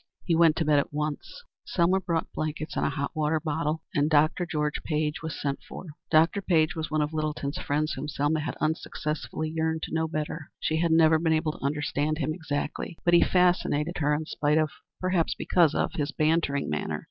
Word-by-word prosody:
He 170 Hz, -, +1 dB
went 165 Hz, -1 st, +5 dB
to 165 Hz, -, 0 dB
bed 150 Hz, -1 st, +4 dB
at -, -, -2 dB
once; 150 Hz, -, -4 dB, 0.2 s
Selma 180 Hz, +2 st, +2 dB
brought 170 Hz, -3 st, -2 dB
blankets 155 Hz, 0 st, -4 dB
and -, -, 0 dB
a -, -, +2 dB
hot 140 Hz, +1 st, -3 dB
water 155 Hz, +1 st, +1 dB
bottle, 155 Hz, 0 st, -2 dB
and 145 Hz, +1 st, +2 dB
Dr. 155 Hz, +3 st, +3 dB
George 150 Hz, -3 st, -1 dB
Page 150 Hz, -1 st, -1 dB
was 160 Hz, -1 st, -5 dB
sent 140 Hz, -1 st, -2 dB
for. -, -, -8 dB, 0.2 s
Dr. 165 Hz, +5 st, +4 dB
Page 160 Hz, -4 st, +2 dB
was 160 Hz, -1 st, -3 dB
the -, -, -11 dB
one 155 Hz, -1 st, +2 dB
of 150 Hz, +2 st, -4 dB
Littleton's 150 Hz, -2 st, -2 dB
friends 155 Hz, +2 st, -1 dB
whom 135 Hz, +3 st, -5 dB
Selma 150 Hz, +2 st, 0 dB
had 150 Hz, -1 st, -3 dB
unsuccessfully 155 Hz, 0 st, -3 dB
yearned 160 Hz, 0 st, -1 dB
to -, -, -5 dB
know 160 Hz, 0 st, +1 dB
better. 155 Hz, -1 st, -4 dB
She 160 Hz, -, 0 dB
had 165 Hz, 0 st, +1 dB
never 160 Hz, -1 st, +5 dB
been 160 Hz, -1 st, +2 dB
able 155 Hz, 0 st, +1 dB
to -, -, -12 dB
understand 150 Hz, +1 st, -1 dB
him 155 Hz, 0 st, -1 dB
exactly, 160 Hz, 0 st, -4 dB
but 175 Hz, -, +4 dB
he 170 Hz, -, +7 dB
fascinated 175 Hz, -3 st, +2 dB
her 145 Hz, -1 st, +2 dB
in 155 Hz, +1 st, -3 dB
spite 150 Hz, 0 st, +1 dB
of 155 Hz, -1 st, +2 dB, 0.3 s
perhaps 185 Hz, -3 st, +1 dB
because 165 Hz, -4 st, +3 dB
of -, -, 0 dB
his 150 Hz, 0 st, -2 dB
bantering 155 Hz, -3 st, +1 dB
manner. 75 Hz, -, -2 dB
155 Hz, 205 wpm, -27 LUFS, 150-165 Hz, 0.3 s, he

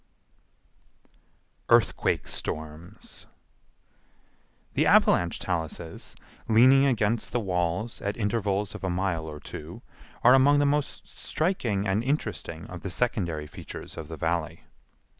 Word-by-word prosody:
Earthquake -, -, +3 dB
Storms 80 Hz, +2 st, -6 dB, 1.5 s
The -, -, +2 dB
avalanche 85 Hz, -1 st, +4 dB
taluses, 80 Hz, -1 st, -4 dB, 0.3 s
leaning 130 Hz, +5 st, +6 dB
against 115 Hz, -3 st, +1 dB
the 120 Hz, -, +1 dB
walls 90 Hz, +2 st, -1 dB
at 100 Hz, +1 st, -3 dB
intervals 105 Hz, -2 st, -1 dB
of -, -, -9 dB
a 95 Hz, -, 0 dB
mile 90 Hz, -3 st, -1 dB
or 75 Hz, -1 st, -8 dB
two, 85 Hz, +12 st, -9 dB, 0.4 s
are 125 Hz, -, +8 dB
among 140 Hz, +2 st, +6 dB
the 145 Hz, -, +3 dB
most 145 Hz, 0 st, -1 dB
striking 125 Hz, -, -1 dB
and 100 Hz, +4 st, +1 dB
interesting 125 Hz, -, -2 dB
of 90 Hz, -1 st, -9 dB
the 95 Hz, -, -4 dB
secondary 85 Hz, -7 st, -1 dB
features 75 Hz, -, -8 dB
of 80 Hz, -2 st, -7 dB
the 80 Hz, 0 st, -7 dB
Valley. 80 Hz, +1 st, -2 dB
95 Hz, 120 wpm, -27 LUFS, 85-120 Hz, 1.5 s, are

